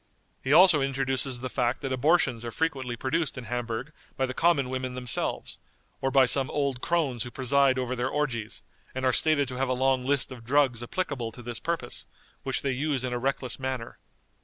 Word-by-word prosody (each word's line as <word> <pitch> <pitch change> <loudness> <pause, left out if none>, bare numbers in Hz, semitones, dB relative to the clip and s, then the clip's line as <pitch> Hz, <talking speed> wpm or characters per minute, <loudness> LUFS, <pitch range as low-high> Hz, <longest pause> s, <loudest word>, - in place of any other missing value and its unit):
He 130 - -1
also 170 -1 +7
introduces 135 -2 0
the 130 - -2
fact 125 +1 -1
that 135 -1 -2
abortions 130 -4 +2
are 120 - -4
frequently 135 -4 -2
produced 140 +5 -1
in 125 - -5
Hamburg 120 +4 -4 0.2
by 135 - +2
the 130 - -4
common 145 -5 +2
women 130 -1 -3
themselves, 125 -1 -3 0.4
or 135 - +1
by 135 -1 +5
some 130 +1 +5
old 140 -3 -1
crones 150 -9 0
who 120 - -3
preside 130 +2 +2
over 130 0 -2
their 125 +1 -1
orgies, 125 -8 -2 0.3
and 130 0 -2
are 130 - +3
stated 150 -1 +3
to 125 - -6
have 135 0 0
a - - +2
long 130 0 +1
list 135 0 0
of 125 -3 -9
drugs 130 -1 +2
applicable 125 -5 -3
to 120 - -11
this 120 -1 -4
purpose, 165 -7 -3 0.3
which 135 -1 -2
they 135 - 0
use 135 0 -1
in 125 -1 -2
a 120 - -1
reckless 130 0 -2
manner. 130 -3 -4
130 Hz, 200 wpm, -27 LUFS, 125-140 Hz, 0.4 s, also